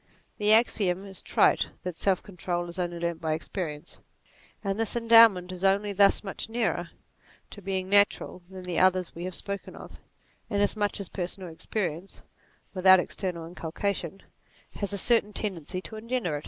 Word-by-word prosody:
The 210 0 +3
axiom 200 -4 +3
is 190 -2 -8
trite - - +2
that 180 -2 -4
self 190 +1 +1
control 175 -2 -4
is 170 +2 -7
only 175 -1 -2
learnt 170 -1 -3
by 160 -1 0
experience: 160 -1 -6 0.6
and 195 +1 -2
this 225 0 -1
endowment 225 -6 +6
is 185 0 -7
only 200 +1 +2
thus 200 +1 +4
much 195 +2 -5
nearer 220 -7 -1 0.6
to 205 - -10
being 190 -1 -3
natural 200 -2 +3
than 190 -1 -9
the 180 -2 -2
others 185 -1 +2
we 170 +2 -6
have 185 -1 -5
spoken 200 -1 -6
of, - - -12 0.5
inasmuch 205 0 0
as 200 - -4
personal 185 0 -5
experience, 175 +1 -5 0.5
without 190 0 +6
external 180 -2 -4
inculcation, 175 +2 -4 0.5
has 200 -1 -4
a 200 - -2
certain 210 0 +2
tendency 185 -4 -3
to 220 - -8
engender 230 -7 -2
it. - - -5
190 Hz, 160 wpm, -27 LUFS, 175-205 Hz, 0.6 s, endowment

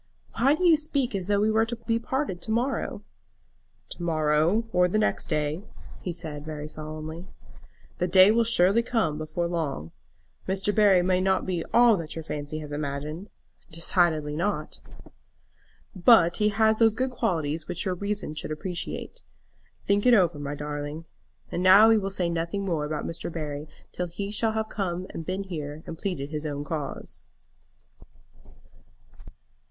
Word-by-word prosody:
"Why 275 +5 +4
do 365 - -1
you 325 -2 +6
speak 285 -5 0
as 190 -2 -3
though 205 -1 +2
we 215 +1 +2
were 220 +1 +3
to 240 - -2
be 230 0 -1
parted 250 -7 -3
to 220 - -5
morrow?" 245 +5 -1 0.9
"To - - -7
morrow 160 +6 +1
or 180 0 +4
next 215 +4 0
day," 150 +1 -1 0.4
he 180 - -3
said 160 -4 -5
very 150 -1 -6
solemnly. 155 +3 -7 0.7
"The 180 - +1
day 185 +2 +7
will 230 +1 +3
surely 220 -1 +4
come 225 -11 -1
before 155 +2 -2
long. 155 - -3 0.6
Mr. 195 +2 0
Barry 200 -4 +5
may 185 0 +2
not 190 0 +1
be 175 -3 -2
all 235 -3 +6
that 165 -3 -6
your 165 - -5
fancy 150 0 -5
has 150 -1 -8
imagined." 150 +5 -4 0.4
"Decidedly 160 -2 +1
not." 195 +6 -2 1.2
"But 175 -3 +5
he 210 -1 +3
has 220 +1 +2
those 225 -2 +4
good 260 +2 -1
qualities 160 -8 -1
which 175 - -3
your 185 - 0
reason 200 -2 -3
should 155 0 -5
appreciate. 170 +3 -5 0.6
Think 200 +4 +2
it 245 - +7
over, 175 -7 +2
my 145 0 -4
darling. 150 +2 -5 0.5
And 175 - -2
now 195 +4 +8
we 225 -1 +5
will 195 -1 -3
say 185 -2 -1
nothing 170 +4 -2
more 165 -5 -1
about 150 0 -3
Mr. 165 +1 -5
Barry 150 -2 -5 0.2
till 180 - -3
he 200 +4 -5
shall 220 +1 +1
have 220 0 -1 0.6
been 190 +2 -2
here 155 -4 -6
and 165 - -6
pleaded 155 -5 -4
his 155 0 -3
own 145 -1 -4
cause." 145 -2 -6
175 Hz, 160 wpm, -26 LUFS, 155-210 Hz, 1.2 s, now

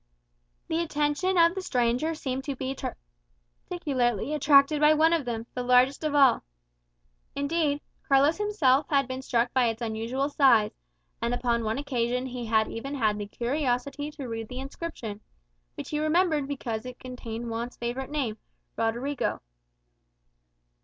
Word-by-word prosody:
The 325 +1 0
attention 310 +4 0
of 335 0 +6
the 380 - -4
stranger 250 +2 0
seemed 265 -3 -3
to 280 - -3
be 265 +1 -3 0.9
particularly 270 - 0
attracted 290 0 +5
by 305 +1 +6
one 320 +2 +4
of 325 -5 0
them, 230 -2 -3
the 250 - -3
largest 250 +4 +3
of 305 -1 0
all. 275 -3 +5 0.9
Indeed, 290 0 0 0.3
Carlos 280 +3 +4
himself 305 -10 +2
had 275 -3 +2
been 260 0 -4
struck 240 -2 0
by 255 -2 +3
its 225 0 -2
unusual 235 +4 -2
size; 260 -7 +4 0.5
and 235 +1 0
upon 235 -1 0
one 220 +2 -1
occasion 250 -3 -1
he 250 -2 -5
had 220 -1 +3
even 275 +5 -5
had 215 -5 +1
the 205 - -4
curiosity 270 +4 -2
to 285 -4 -7
read 225 -1 -5
the 250 - -6
inscription, 265 -7 -6 0.5
which - - -7
he 300 - 0
remembered 310 -2 +2
because 235 -6 -4
it 250 0 -8
contained 240 -2 -7
Juan's 235 +1 -4
favourite 245 +3 -4
name. 260 -8 -2 0.4
Rodrigo. 240 +5 -1
265 Hz, 150 wpm, -27 LUFS, 235-295 Hz, 0.9 s, of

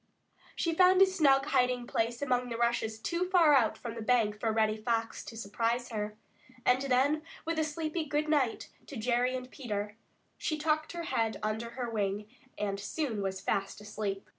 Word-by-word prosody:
She 335 - 0
found 370 +2 +6
a - - +8
snug 285 -8 +3
hiding 250 -3 +1
place 235 +2 -1
among 250 -2 0
the 230 - -3
rushes 235 -2 0
too 340 +10 -2
far 340 -5 +6
out 240 -6 +3
from 235 -2 -6
the 230 - -6
bank 220 -3 +2
for 225 0 +1
Reddy 215 -1 +2
Fox 225 +1 -2
to 225 - -9
surprise 230 +3 -1
her, 210 -2 -4 0.5
and 250 +1 +4
then 275 +3 +2 0.2
with 330 0 -1
a - - +3
sleepy 310 +1 -2
"Good 300 +1 -1
night" 285 -6 +1 0.2
to 280 - -7
Jerry 245 +3 +1
and 255 0 -6
Peter, 210 -5 -4 0.4
she 310 - -1
tucked 310 +1 0
her 340 -1 -4
head 225 -7 0
under 220 +2 -2
her 245 -2 -2
wing 205 -2 -2 0.3
and 200 -1 -2
soon 225 +1 -2
was 190 -1 -3
fast 195 +1 -1
asleep. 205 -1 -4
240 Hz, 185 wpm, -31 LUFS, 215-295 Hz, 0.5 s, a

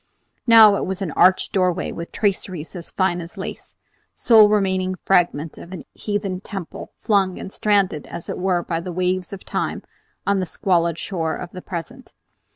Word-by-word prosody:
Now 220 -3 +8
it - - -2
was 190 +1 -3
an 170 - -3
arched 185 +6 +3
doorway 185 -2 +1
with 170 0 -7
traceries 190 -5 -2
as 170 -2 -6
fine 185 -2 0
as 170 +1 -10
lace, - - -7 0.4
sole 220 -3 +6
remaining 190 -3 +1
fragment 170 -5 +1
of 170 - -11
a 185 -4 -8
heathen 205 -3 -3
temple, 195 -5 -7
flung 195 -4 +1
and 190 - -8
stranded 200 -7 +1
as 170 0 -8
it - - -4
were 180 -2 +1
by 165 -1 -2
the 180 +2 -6
waves 180 0 -1
of 195 - -9
time - - -3 0.4
on 200 -1 +2
the 185 - -2
squalid 170 -2 +1
shore 165 -5 -2
of 180 - -7
the 185 - -8
present. 235 +11 -8
185 Hz, 175 wpm, -21 LUFS, 175-200 Hz, 0.4 s, Now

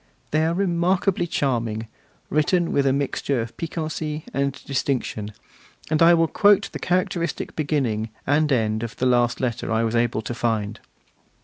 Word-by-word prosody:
They 155 +1 +2
are 165 - 0
remarkably 180 0 +1
charming, 115 -7 -1 0.5
written 165 +3 +2
with 140 -1 +2
a - - +4
mixture 140 -1 -1
of 115 0 -5
piquancy 155 -2 -4
and 140 0 0
distinction; 130 -6 -2 0.6
and 155 - +2
I 170 +1 +8
will 165 0 +3
quote 205 +3 +4
the - - -6
characteristic 180 -1 -1
beginning 130 -8 -1 0.2
and 150 +1 +2
end 110 -4 +1
of 115 -1 -5
the 130 - -1
last 120 -1 +2
letter 120 -2 -2
I 110 +1 +2
was 115 0 0
able 115 -1 +1
to 110 - -4
find. 110 -3 -1
140 Hz, 155 wpm, -23 LUFS, 115-165 Hz, 0.6 s, I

